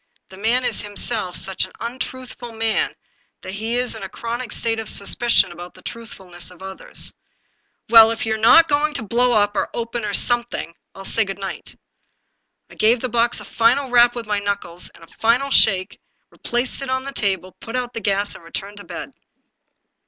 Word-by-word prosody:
The 190 - -13
man 235 +5 +1
is - - 0
himself 205 -2 -1
such 190 -1 0
an - - -7
untruthful 245 0 -6
man 225 0 0 0.5
that - - -7
he 220 +4 -2
is 250 0 +1
in 220 - -7
a 195 - -6
chronic 235 +2 -5
state 225 -1 -1
of 220 - -3
suspicion 215 -1 +3
about 175 +1 -10
the - - -16
truthfulness 190 -7 -9
of 180 +1 -14
others. 190 0 -5 0.4
" - - -46
Well, 225 -1 +10
if 225 0 -2
you're 220 0 0
not 325 +9 +7
going 295 0 +1
to - - -1
blow 240 +3 +2
up, 205 -1 +3
or - - 0
open, 235 0 -3
or 205 -1 -1
some 240 -1 +3
thing, 170 -7 -6 0.2
1*11 195 - -9
say 225 - +3
good 195 -2 -6
night." 195 -1 -6 1.0
I - - -12
gave 225 +3 +3
the 255 - -2
box 235 +1 +1
a - - -10
final 245 +3 +2
rap 240 0 +6
with 235 -1 -5
my 210 -1 0
knuckles 200 -4 -3
and 170 - -16
a 165 - -17
final 245 +5 +2
shake, 190 -7 +3 0.3
replaced 245 +3 -2
it 275 - -5
on 260 0 0
the 275 0 -6
table, 190 -5 -1
put 230 - -7
out 245 -1 -2
the 230 - -4
gas, 200 0 0
and - - -11
re 165 - -13
turned 200 +4 -6
to 205 - -9
bed. - - -7
225 Hz, 205 wpm, -21 LUFS, 200-240 Hz, 1.0 s, Well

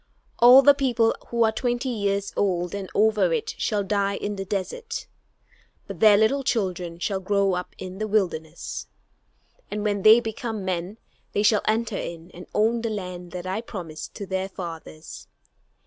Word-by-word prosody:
All 250 +3 +9
the 285 - +8
people 250 -5 +1
who 235 -1 +1
are 220 - +3
twenty 245 +3 -1
years 200 -3 -1
old 180 -3 0
and 200 -2 -5
over 210 -4 +3
it 165 - -1
shall 210 -2 0
die 200 0 0
in 205 +1 -3
the 195 -1 -5
desert; 205 - -4 0.8
but - - -8
their 215 -2 +7
little 265 +6 +2
children 180 -8 -1
shall 190 +2 -2
grow 195 0 +1
up 180 0 -4
in 185 +1 -8
the 215 - -2
wilderness, 175 -6 -2 0.8
and 210 0 -3
when 205 -2 0
they 220 +3 +8
become 225 -2 -4
men 185 +3 -3 0.4
they 205 - +1
shall 210 0 +4
enter 220 -1 0
in 170 +1 -7
and 180 +2 -11
own 225 +2 +2
the 230 - -2
land 180 -4 -6
that 180 0 -6
I 190 +4 -2
promised 170 -9 -8
to 200 - -5
their 190 0 -2
fathers. 165 -4 -8
200 Hz, 170 wpm, -24 LUFS, 185-220 Hz, 0.8 s, All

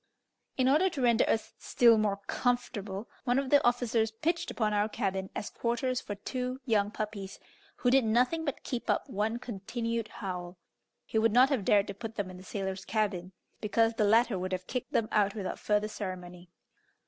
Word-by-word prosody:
In 260 -1 +3
order 310 +8 +4
to 295 -6 -5
render 235 -2 +4
us 220 - 0
still 235 -2 +5
more 200 -2 0
comfortable, 220 -5 -2 0.2
one 245 -1 +2
of 275 -1 -1
the 285 - +6
officers 240 -2 +2
pitched 335 +10 -1
upon 215 -2 0
our 205 +1 +2
cabin 190 -2 -2
as - - -4
quarters 245 +2 -1
for 205 - -5
two 255 +5 -4
young 210 -5 +2
puppies, 210 -2 -5 0.4
who 245 - +1
did 265 0 +5
nothing 250 +9 +2
but 280 -4 -4
keep 245 -2 -4
up - - +1
one 220 -1 -1
continued 230 0 -3
howl; 180 -4 -6 0.5
he 220 - 0
would 225 -1 +3
not 255 +3 +6
have 265 -8 0
dared 200 +1 +4
to 200 - -5
put 225 +2 -7
them 195 -3 -3
in 180 - -10
the 185 - -12
sailors' 190 -1 -4
cabin, 195 -5 -1 0.3
because 225 +2 +2
the 220 - +1
latter 220 -1 +4
would 185 +1 -3
have 185 0 -3
kicked 250 +4 -4
them 220 - +1
out 205 -1 +2
without 200 -3 -4
farther 210 0 +1
ceremony. 180 -4 -7
220 Hz, 190 wpm, -30 LUFS, 200-245 Hz, 0.5 s, the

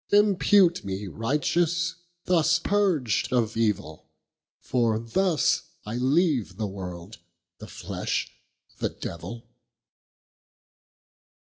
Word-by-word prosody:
Impute 200 -3 +4
me 95 +1 -4
righteous, 165 - 0 0.3
thus 170 -1 +3
purg'd 170 - +1
of 115 -3 +1
evill, 100 -8 -1 0.5
For 115 -3 +1
thus 155 - +1 0.2
I 105 - -5
leave 130 - +1
the 110 - -1
world, 95 +1 -7 0.4
the - - -9
flesh, - - -3 0.5
the - - 0
devill. 115 +8 -7
125 Hz, 90 wpm, -26 LUFS, 105-175 Hz, 0.5 s, Impute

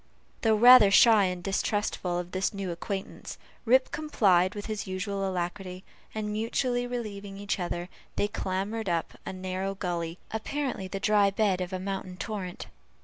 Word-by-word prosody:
Though 220 -1 +4
rather 240 -1 +9
shy 215 0 +6
and 180 -1 -3
distrustful 195 -2 -1
of 175 0 -5
this 190 +2 -1
new 195 -2 -3
acquaintance, 190 +3 -6 0.3
Rip 255 +3 +4
complied 200 - +2
with 205 - -5
his 215 -3 -4
usual 195 +1 -2
alacrity; 185 +1 -4 0.3
and 210 -1 -2
mutually 245 +3 0
relieving 205 -5 -5
each 200 0 -2
other, 175 0 -3 0.3
they 205 - +1
clambered 205 +1 -3
up 170 -2 -1
a - - -2
narrow 185 +1 -3
gully, 170 -3 -3
apparently 250 -2 -3
the 195 +1 -5
dry 205 -1 +4
bed 195 -2 +1
of 180 +1 -4
a 185 - -2
mountain 190 -1 -5
torrent. 190 -4 -5
195 Hz, 155 wpm, -28 LUFS, 185-215 Hz, 0.3 s, rather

